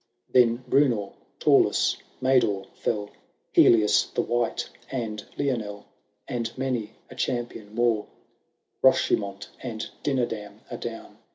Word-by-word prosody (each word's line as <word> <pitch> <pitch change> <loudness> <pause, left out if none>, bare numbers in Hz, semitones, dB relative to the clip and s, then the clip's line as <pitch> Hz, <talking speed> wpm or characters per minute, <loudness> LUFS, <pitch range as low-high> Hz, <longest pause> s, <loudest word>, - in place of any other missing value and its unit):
Then 120 0 +4
Bnmor, 120 -8 +2 0.3
Taulas, - - +4 0.3
Mador, 125 -7 +3
fell, 105 -2 -2 0.4
Helias 110 -3 +5
the - - +2
White, 120 -1 -1 0.2
and 110 -5 -3
Lionel, 115 -8 -2 0.4
And 120 -3 -2
many 130 -5 -2 0.2
a - - -9
champion 120 -4 -3
more; 115 -3 +2 0.7
Rochemont 100 0 +2
and 115 -4 -4
Dinadam 115 -7 -2
are - - -4
down. 115 -1 -7
115 Hz, 105 wpm, -26 LUFS, 105-125 Hz, 0.7 s, Helias